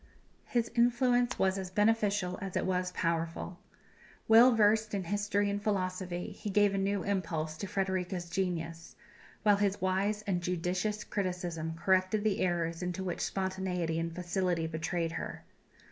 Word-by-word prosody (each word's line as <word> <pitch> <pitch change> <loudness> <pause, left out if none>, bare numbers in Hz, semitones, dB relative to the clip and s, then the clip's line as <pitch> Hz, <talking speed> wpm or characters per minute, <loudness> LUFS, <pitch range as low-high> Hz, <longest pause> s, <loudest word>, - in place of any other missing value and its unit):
His 235 -1 0
influence 245 +1 +3
was 190 0 +2
as 185 -1 -5
beneficial 205 -2 +1
as 195 -2 -3
it - - 0
was 180 -1 0
powerful. 165 +1 -2 0.7
Well 230 +2 +8
versed 215 0 +3
in 195 - -1
history 205 +2 0
and 200 0 -1
philosophy, 185 -3 -2
he 210 - -6
gave 205 0 +3
a 195 - 0
new 195 0 0
impulse 165 -6 -2
to 200 - -4
Frederika's 185 -2 -2
genius, 170 -2 -3 0.5
while 205 -2 +5
his 200 -1 +1
wise 195 +3 0
and 190 -4 -1
judicious 180 +4 -1
criticism 175 -4 -3
corrected 185 +4 +2
the 215 -2 +1
errors 170 -2 0
into 180 +1 -3
which 180 -2 -3
spontaneity 185 -4 -1
and 165 0 -3
facility 180 -2 0
betrayed 165 +1 -2
her. 165 - -5
190 Hz, 145 wpm, -31 LUFS, 175-205 Hz, 0.7 s, Well